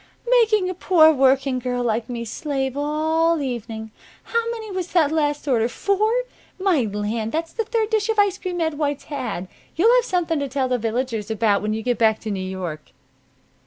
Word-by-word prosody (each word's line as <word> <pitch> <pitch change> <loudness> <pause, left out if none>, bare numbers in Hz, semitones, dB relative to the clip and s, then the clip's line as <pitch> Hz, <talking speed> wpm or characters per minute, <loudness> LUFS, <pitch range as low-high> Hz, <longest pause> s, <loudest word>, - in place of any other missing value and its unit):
"Making 430 -4 +2
a 370 - -2
poor 335 -3 +5
working 265 -1 +2
girl 245 0 -2
like 230 0 -1
me 235 -1 -4
slave 270 +1 -3
all 315 +3 +1
evening! 225 -5 -5 0.3
How 465 0 -1
many 445 -3 -5
was 370 -1 -4
that 320 -5 +3
last 295 -2 0
order? 235 -3 +2
Four? 400 - +1 0.5
My 370 -7 +2
land! 215 +2 -3
that's 330 +1 -3
the 450 - -2
third 450 0 -1
dish 435 -1 +1
of 445 - 0
ice 405 -2 +3
cream 360 -2 -4
Ed 320 -2 -1
White's 290 -2 -1
had! 235 -11 -4 0.3
You'll 450 +9 +5
have - - +2
something 340 -6 0
to 280 - -2
tell 265 0 0
the 250 -1 0
villagers 225 -1 -2
about 215 -2 +2
when 215 +1 -1
you 220 - -4
get 245 0 0
back 220 -1 +4
to 220 - -4
New 195 -2 -3
York." 185 -5 -6
285 Hz, 195 wpm, -22 LUFS, 230-360 Hz, 0.5 s, poor